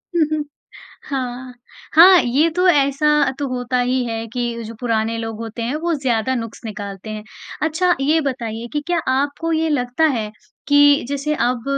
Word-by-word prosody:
हुँ, 330 -2 +4
हुँ। 310 -1 0 0.7
हाँ। 255 -2 -4 0.4
हाँ, 360 +3 +9
ये 280 +7 +2
तो 365 +1 +3
ऐसा 280 -2 +2 0.3
तो 285 - -1
होता 250 0 -2
ही 250 +1 +1
है 225 -1 -4
कि 235 0 -3
जो 225 +1 -8
पुराने 230 -2 -1
लोग 225 -1 -5
होते 230 +1 -6
हैं, 245 +5 -2
वो 335 +2 -1
ज़्यादा 260 -3 0
नुक़्स 230 -2 -6
निकालते 205 -1 -7
हैं। 215 -1 -6 0.4
अच्छा, 350 +3 +2
ये 305 +4 +3
बताइए 235 -5 -4
कि 295 - -1
क्या 350 -1 +1
आपको 285 +5 -1
ये 320 0 +1
लगता 250 0 0
है 215 -1 -4 0.4
कि 290 -1 +5
जैसे 285 +2 -1
अब, 245 -3 0
255 Hz, 175 wpm, -20 LUFS, 230-300 Hz, 0.7 s, हाँ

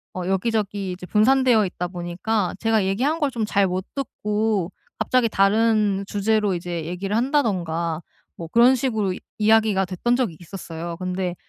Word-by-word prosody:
어 180 0 -4
여기저기 200 -1 -1
이제 180 0 -7
분산되어 235 0 +4
있다 180 - -2
보니까 180 +3 -2
제가 220 -3 +2
얘기한 265 +12 0
걸 290 -2 +1
좀 225 -3 -2
잘 200 -2 +2
못 185 +1 -3
듣고 210 -7 -1 0.3
갑자기 250 -2 +2
다른 210 -1 +2
주제로 210 -1 +1
이제 170 -2 -4
얘기를 190 +4 -3
한다든가 180 - 0 0.4
뭐 165 - -6
그런 240 +7 +5
식으로 220 -7 -1 0.3
이야기가 215 -3 +3
됐던 190 +7 0
적이 230 -11 -1
있었어요. 170 -2 -7
근데 185 -1 -3
200 Hz, 335 characters per minute, -23 LUFS, 180-225 Hz, 0.4 s, 그런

